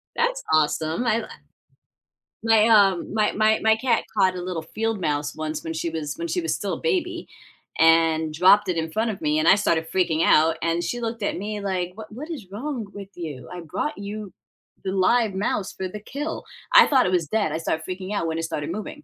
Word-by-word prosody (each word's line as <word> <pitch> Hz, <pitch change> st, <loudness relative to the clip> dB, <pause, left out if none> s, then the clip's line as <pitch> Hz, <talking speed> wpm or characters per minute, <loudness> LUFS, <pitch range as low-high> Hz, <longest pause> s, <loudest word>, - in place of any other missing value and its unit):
That's -, -, 0 dB
awesome. 155 Hz, +6 st, +1 dB
I 225 Hz, -1 st, +2 dB
li -, -, -6 dB, 1.2 s
my, 225 Hz, -1 st, +5 dB
um, 200 Hz, -5 st, +4 dB
my 215 Hz, -1 st, +2 dB
my 215 Hz, +1 st, +2 dB
my 220 Hz, 0 st, +5 dB
cat 235 Hz, 0 st, +1 dB
caught 185 Hz, -2 st, +3 dB
a 180 Hz, -, -4 dB
little 180 Hz, -2 st, -4 dB
field 220 Hz, +5 st, -3 dB
mouse 145 Hz, -2 st, -1 dB
once 155 Hz, 0 st, -4 dB
when 160 Hz, -, -4 dB
she 165 Hz, +1 st, -2 dB
was 155 Hz, -3 st, -4 dB
when 170 Hz, -, -3 dB
she 165 Hz, -, -1 dB
was 160 Hz, -1 st, -1 dB
still 200 Hz, +3 st, -3 dB
a -, -, -4 dB
baby, 360 Hz, -6 st, -1 dB, 0.5 s
and 160 Hz, -1 st, +4 dB
dropped 190 Hz, +5 st, +5 dB
it 175 Hz, -, 0 dB
in 160 Hz, 0 st, -2 dB
front 220 Hz, +5 st, 0 dB
of 200 Hz, -, -5 dB
me, 150 Hz, 0 st, +1 dB
and 155 Hz, -, +1 dB
I -, -, +8 dB
started 165 Hz, -5 st, 0 dB
freaking 170 Hz, -4 st, +1 dB
out. 160 Hz, +1 st, +4 dB
And 170 Hz, +1 st, 0 dB
she 240 Hz, +6 st, -3 dB
looked 225 Hz, -2 st, -4 dB
at -, -, -1 dB
me 210 Hz, +2 st, -4 dB
like, 185 Hz, -3 st, -2 dB
what 220 Hz, 0 st, -10 dB
what 295 Hz, +9 st, -8 dB
is 270 Hz, -, -7 dB
wrong 245 Hz, +1 st, -4 dB
with 200 Hz, -1 st, -9 dB
you? 145 Hz, -8 st, -7 dB
I 180 Hz, -, -7 dB
brought 170 Hz, -, -4 dB
you 205 Hz, 0 st, -6 dB, 0.5 s
the 190 Hz, -, -1 dB
live 200 Hz, +3 st, +2 dB
mouse 195 Hz, 0 st, -2 dB
for 190 Hz, -, -4 dB
the 210 Hz, +3 st, -8 dB
kill. 285 Hz, +9 st, -5 dB, 0.3 s
I -, -, +9 dB
thought 265 Hz, -3 st, +4 dB
it -, -, 0 dB
was 175 Hz, -4 st, +1 dB
dead. 205 Hz, -3 st, 0 dB
I 155 Hz, -, -1 dB
started 160 Hz, -1 st, -2 dB
freaking 185 Hz, +2 st, -5 dB
out 170 Hz, -, -1 dB
when 160 Hz, 0 st, -2 dB
it 165 Hz, -, -3 dB
started 150 Hz, -1 st, -3 dB
moving. 215 Hz, -, -6 dB
190 Hz, 225 wpm, -24 LUFS, 165-220 Hz, 1.2 s, I